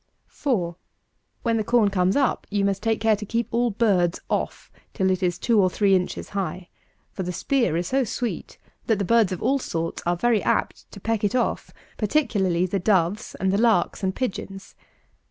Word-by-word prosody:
4. 185 - -2 0.7
When 230 -1 +1
the 220 - 0
corn 230 -1 +3
comes 185 0 +2
up, 275 -3 +1
you 205 -1 0
must 200 0 0
take 225 0 0
care 220 -1 +3
to 210 - -7
keep 230 +3 -1
all 240 +1 +2
birds 195 -6 +1
off - - -2 0.2
till 190 0 +2
it 185 0 -1
is 175 -2 0
two 225 -4 +3
or 185 - +3
three 200 +1 +2
inches 180 -1 -2
high; 185 -2 -4 0.4
for - - -5
the 180 -1 -3
spear 235 - 0
is 175 +1 -2
so 270 0 +2
sweet, 240 +1 -4 0.3
that 220 - +3
the 200 - -1
birds 230 -2 +3
of 185 - -4
all 275 +1 +2
sorts 165 -8 -3
are 175 +1 +1
very 225 +3 +2
apt - - -1
to - - -10
peck 225 +1 -1
it 205 +3 +1
off, 245 - 0 0.3
particularly 200 - +1
the 195 +2 -1
doves 190 +2 +1
and 190 0 0
the 200 - +2
larks 220 -7 +2
and 190 -1 -1
pigeons. 195 -5 -5
200 Hz, 195 wpm, -24 LUFS, 185-230 Hz, 0.7 s, corn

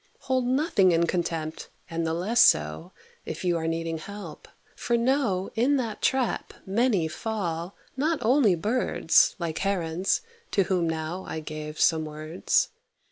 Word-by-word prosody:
Hold 260 -2 0
nothing 255 - +3
in 165 +1 +3
contempt, 165 -2 -3 0.2
and 165 0 -2
the 160 - -1
less 210 +8 +2
so, 75 +1 +2 0.3
If - - -6
you 175 -1 +2
are 160 0 -2
needing 165 0 -2
help, 200 +5 -9 0.3
for 235 - 0
know 235 -7 +1
In 260 +5 +2
that 230 -5 -3
trap 265 -3 0
many 200 -4 +2
fall, 175 -2 -4 0.2
not 310 +4 +1
only 230 -5 +4
birds, 210 -1 +2
Like 165 -2 -3
Herons, 185 -2 0 0.3
to 195 - +4
whom 175 -2 0
now 160 +3 -3
I 160 - -4
gave 155 0 -7
some 160 -2 +3
words. 155 +3 0
180 Hz, 145 wpm, -26 LUFS, 160-230 Hz, 0.3 s, only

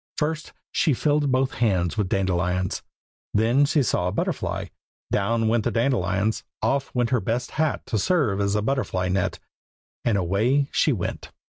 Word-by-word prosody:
First 155 +1 -2 0.2
she 150 - +2
filled 145 +1 +1
both 130 +1 +1
hands 90 -7 +2
with 105 -4 -1
dandelions. 90 -1 0 0.5
Then 115 +7 +4
she 145 0 +2
saw 90 -6 0
a - - 0
butterfly; - - -2 0.4
down 115 +3 +1
went 110 0 +2
the - - +1
dandelions; 110 -4 0 0.2
off 140 0 0
went 120 0 +1
her 125 -3 +2
best 120 +1 -2
hat 155 -1 -1
to 110 - -1
serve 110 - +1
as 100 0 +1
a 105 - +1
butterfly 110 -8 -1
net; 90 0 0 0.7
and 115 -4 +2
away 110 +10 +1
she 155 - +3
went. 100 -9 -3
115 Hz, 160 wpm, -24 LUFS, 95-135 Hz, 0.7 s, Then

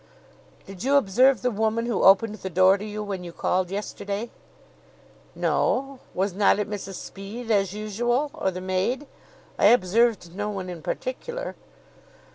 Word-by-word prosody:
"Did 195 +1 -9
you 275 +2 +3
observe 255 -1 +4
the 250 - +2
woman 220 +2 0
who 235 -3 -1
opened 200 +3 +5
the 190 - -6
door 185 +2 +5
to 200 - -6
you 210 0 -5
when 195 -3 -5
you 175 - -7
called 180 +1 0
yesterday?" 205 +2 -4 1.0
"No. 270 0 0 0.2
Was 195 +1 0
not 200 +1 +4
it 210 - -1
Mrs 200 -2 -6
Speed, 220 +7 -7
as 195 -3 +2
usual, 240 +7 -1
or - - -1
the 185 0 -6
maid? 185 +10 -1 0.5
I - - +6
observed 210 -4 +3
no 205 +1 -2
one 190 -3 -4
in 170 -2 -8
particular." 480 - -4
205 Hz, 155 wpm, -25 LUFS, 190-240 Hz, 1.0 s, I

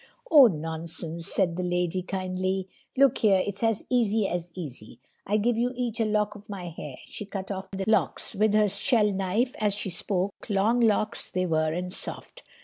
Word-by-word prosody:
"Oh, 285 -5 +9
nonsense," 165 -1 -4
said 180 -4 +1
the - - -1
lady 180 0 0
kindly. 185 0 -2 0.3
"Look 275 -2 +4
here, 195 -4 +4
it's 200 -1 -4
as 225 -2 +1
easy 225 -4 +2
as 175 -1 -3
easy. 135 -11 -7 0.3
I 210 - +2
give 230 +2 +1
you 245 +1 +1
each 240 -2 -3
a 225 - +2
lock 210 -1 +1
of 210 0 -14
my 185 -4 -5
hair," 150 -4 -8
she - - -7
cut 195 -1 -6
off 190 0 -5
the 195 0 -4
locks 220 - +2
with 210 +1 +2
her 215 -1 +5
shell 210 +2 +2
knife 195 +6 0
as 210 -2 +1
she 200 -2 -2
spoke, 190 +3 -2
long 210 +4 +2
locks 220 -1 +1
they 185 0 -1
were 155 -2 +1
and 180 +2 -4
soft. - - -6
195 Hz, 190 wpm, -27 LUFS, 180-215 Hz, 0.3 s, Oh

